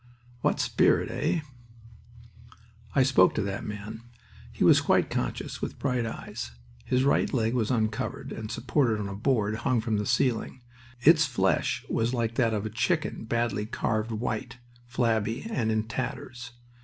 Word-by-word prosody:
What - - +1
spirit, - - +2
eh?" 170 - 0 1.5
I 135 - +6
spoke 135 0 +4
to - - +1
that 100 0 -3
man. 105 +1 -6 0.5
He - - -1
was - - +6
quite - - +2
conscious, - - -3
with - - -4
bright 125 -4 0
eyes. 110 - -6 0.4
His 125 +1 +2
right 140 - +2
leg 115 -3 +1
was 115 -4 0
uncovered, 110 -4 -1
and 110 -1 -6
supported 120 -1 +1
on 100 - -3
a 100 - -5
board 110 -2 +1
hung 125 +1 +1
from 110 -1 0
the 105 -1 -2
ceiling. 125 0 0 0.4
Its 155 +2 +6
flesh 95 -7 0
was 115 +3 0
like 115 -1 -1
that 115 -1 +2
of 105 0 -2
a - - -2
chicken 120 - -1
badly 110 -2 -1
carved 110 0 -1
white, 115 +1 -3 0.3
flabby, 115 - 0
and 110 - 0
in 110 0 +1
tatters. 125 +1 -5
115 Hz, 155 wpm, -28 LUFS, 110-125 Hz, 1.5 s, I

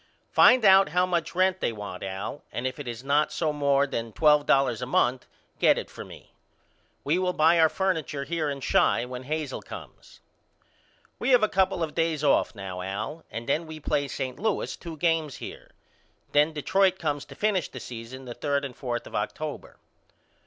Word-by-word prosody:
Find 250 -3 +6
out 195 -2 +7
how 180 +3 +2
much 170 -2 -2
rent 185 0 +2
they - - 0
want 105 -4 -7
Al 95 +9 -5
and 120 - -4
if 130 +3 -3
it 145 - -7
is 120 +1 -6
not 145 +2 +1
no 155 -3 +1
more 140 -1 +2
than 115 -5 -4
twelve 150 -2 +4
dollars 130 -4 +3
a 125 - -3
month 125 0 +1 0.3
get - - +5
it - - -5
for - - -8
me. - - -14 0.7
We 160 +5 +1
will 180 -1 0
buy 165 +2 +4
our 160 -1 +6
furniture 160 -7 -1
here 155 +1 -2
in 140 -1 -4
Chi 120 - +2
when 125 +1 -7
Hazel 155 -1 -3
comes. - - -12 1.0
We - - -1
have 250 -4 +5
a - - +5
couple 190 -3 +1
of 155 - -3
days 165 -3 0
off 140 -4 +2
now 95 -2 -6
Al 105 - -5
and 115 +1 -6
then 155 +4 0
we 155 0 -8
play 145 -1 -1
St. 130 -1 -5
Louis 220 -1 -1
two 165 -2 -9
games 160 -3 0
here. - - -9 0.6
Then 150 +2 +4
Detroit 190 +5 +2
comes 145 -5 -2
to - - -12
finish 205 -6 0
the 130 - -8
season 120 +2 -8
the 120 - -6
third 140 +1 -1
and 130 -3 -7
fourth 120 -3 -4
of - - -12
October. - - -4
150 Hz, 195 wpm, -26 LUFS, 130-170 Hz, 1.0 s, out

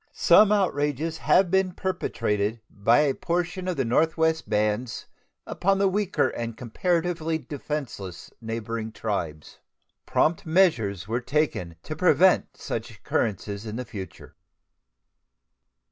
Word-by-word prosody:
Some 210 -1 +6
outrages 160 -5 0
have 185 -2 +3
been 190 -1 +2
perpetrated 115 - -1
by 115 +7 +3
a 145 -3 +2
portion 180 +3 -2
of 180 - -2
the 135 - +1
northwestern 160 +5 +1
bands 105 +3 -1 0.4
upon 195 +1 +1
the 195 0 +3
weaker 195 0 +1
and 115 -1 -5
comparatively 165 +6 -1
defenseless 140 - -6
neighboring 115 0 -4
tribes. 85 -10 -4 0.5
Prompt 160 +1 +2
measures 120 - +2
were 115 +3 -1
taken 125 - -1
to 155 - -5
prevent 180 +2 +3
such - - -4
occurrences 105 0 -3
in 110 +4 -4
future. 100 -5 -9
145 Hz, 115 wpm, -25 LUFS, 110-175 Hz, 0.5 s, Some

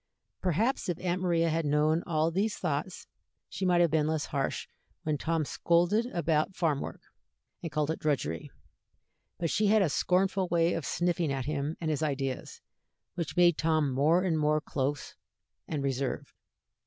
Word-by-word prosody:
Perhaps 195 - 0
if 175 - -1
Aunt 180 0 -1
Maria 170 -2 +2
had 165 +1 0
known 150 +2 +2
all 160 -1 +1
these 205 +5 0
thoughts, - - -3 0.4
she 190 - -2
might 175 -1 +4
have 170 -3 +3
been 155 -1 +2
less 155 -2 0
harsh 140 -2 -2 0.4
when 155 -1 0
Tom 160 +1 -1
scolded 175 - +2
about 170 -4 0
farm 155 -5 +1
work, - - -7 0.6
and 165 - -5
called 150 +1 0
it 160 - -4
drudgery; 125 - -1 0.9
but 165 -2 -1
she 210 0 +2
had 215 0 +5
a 175 - +1
scornful 185 +4 +1
way 170 0 +2
of 140 - -3
sniffing 175 -3 0
at 135 -2 -2
him 150 +1 -2
and 160 -2 -1
his 150 - -1
ideas, 135 -4 -3 0.5
which 170 -2 -4
made 175 -2 +5
Tom 155 -3 +2
more 155 +7 +3
and 165 -4 +1
more 150 0 +2
close 145 -1 -3 0.5
and 145 -3 -3
reserved. 135 -1 -2
160 Hz, 165 wpm, -29 LUFS, 150-175 Hz, 0.9 s, had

